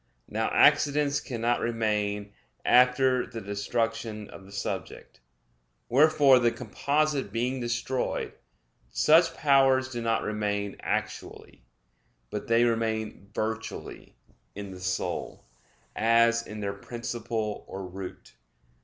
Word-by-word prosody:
Now 110 +1 -1
accidents 145 0 +4
cannot 120 -1 -1
remain 105 -3 -1 0.3
after 125 0 +4
the 115 -2 -7
destruction 110 +1 -3
of 95 -1 -12
the 100 - -15
subject. 100 - -5 0.7
Wherefore, 140 -1 +6
the 120 -1 +3
composite 140 +5 -1
being 125 +3 -1
destroyed, 120 +2 -2 0.6
such 165 - +4
powers 135 -2 +4
do 120 -2 -4
not 115 -1 0
remain 105 -1 -2
actually; - - -4 0.7
but - - -5
they 115 +1 +4
remain 110 -3 -1
virtually 110 +1 -5 0.4
in 100 -1 -7
the 95 - -9
soul, 95 +1 -3 0.5
as 115 +1 +3
in 105 0 -7
their 100 -1 -2
principle 115 0 -4
or 95 0 -6
root. 90 +1 -9
115 Hz, 110 wpm, -27 LUFS, 105-130 Hz, 0.7 s, Wherefore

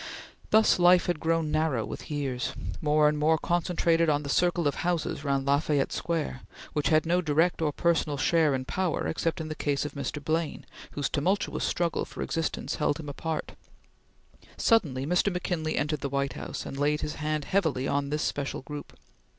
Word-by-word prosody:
Thus 220 -3 +5
life 175 0 +6
had 175 -3 -1
grown 165 -1 0
narrow 155 -7 +1
with - - -8
years, 135 -4 -2 0.3
more 150 0 +4
and 150 0 +1
more 160 +2 +4
concentrated 170 -1 +1
on 150 0 +1
the 140 - -5
circle 175 0 +2
of 145 - +1
houses 170 -4 -1
round 140 -2 0
La 140 +1 +3
Fayette 145 -3 0
Square, 160 -6 -2 0.3
which 150 - 0
had 155 0 +4
no 175 +2 +2
direct 165 +2 +2
or 155 -2 +2
personal 160 -2 +1
share 155 0 +3
in 130 0 -3
power 185 +1 -1
except 165 +2 -1
in 160 - -4
the 155 - -3
case 145 -1 -1
of 150 - -5
Mr. 145 +1 -4
Blaine 155 +2 -2 0.3
whose 145 -1 -1
tumultuous 185 +8 0
struggle 170 -1 0
for - - -6
existence 165 -1 -2
held 150 +1 0
him 150 -2 -6
apart. 155 +2 -4 1.1
Suddenly 145 - +2
Mr. 180 +5 +2
McKinley 175 -3 -2
entered 150 0 -1
the 140 - -2
White 140 0 -1
House - - -6
and 135 - -6
laid 150 +1 +1
his 150 - -4
hand 155 -1 -1
heavily 160 -9 +1
on 140 0 0
this 150 +1 -1
special 140 -2 -2
group. 145 +1 -8
155 Hz, 185 wpm, -28 LUFS, 145-170 Hz, 1.1 s, life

